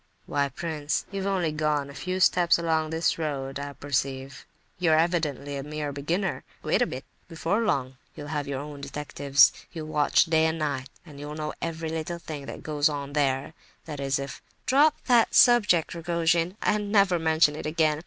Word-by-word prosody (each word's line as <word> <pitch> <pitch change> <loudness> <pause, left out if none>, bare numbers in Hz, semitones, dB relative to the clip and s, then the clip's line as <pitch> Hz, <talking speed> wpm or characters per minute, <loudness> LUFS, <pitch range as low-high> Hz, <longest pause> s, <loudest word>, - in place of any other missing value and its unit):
"Why, 140 -1 0
prince, 150 +1 -3
you've 195 0 -3
only 185 -5 0
gone 150 -2 0
a 140 - -10
few 185 +7 -3
steps 175 -2 +4
along 160 -2 0
this 160 +1 0
road, 135 -3 -3
I 140 0 -5
perceive. 135 -1 -3 0.3
You 175 -3 +3
are - - +5
evidently 150 -4 0
a - - -3
mere 150 0 -4
beginner. 165 +8 -2 0.2
Wait - - +1
a - - +3
bit! - - -7 0.2
Before 170 +5 -1
long, 130 - -1 0.2
you'll 145 0 -8
have 145 -1 -2
your 140 -1 -3
own 145 -1 -8
detectives, 140 -1 +3 0.2
you'll 155 -2 -7
watch 150 +1 +3
day 160 -1 +3
and 160 0 -1
night, 140 -4 -2 0.2
and 145 -4 -12
you'll 145 +1 -6
know 155 0 -4
every 165 -1 -3
little 160 +2 -3
thing 150 -4 -8
that - - -8
goes 150 -1 +1
on 140 -1 -5
there—that 145 +2 -3
is, 135 -1 0
if—" 140 0 -6 0.2
"Drop 290 +3 +4
that 240 -3 +4
subject, 205 -9 +5
Rogojin, 170 +2 0
and 210 -1 0
never 195 -4 +4
mention 160 -2 +3
it 150 - -5
again. 155 -1 +1
155 Hz, 185 wpm, -26 LUFS, 145-170 Hz, 0.3 s, are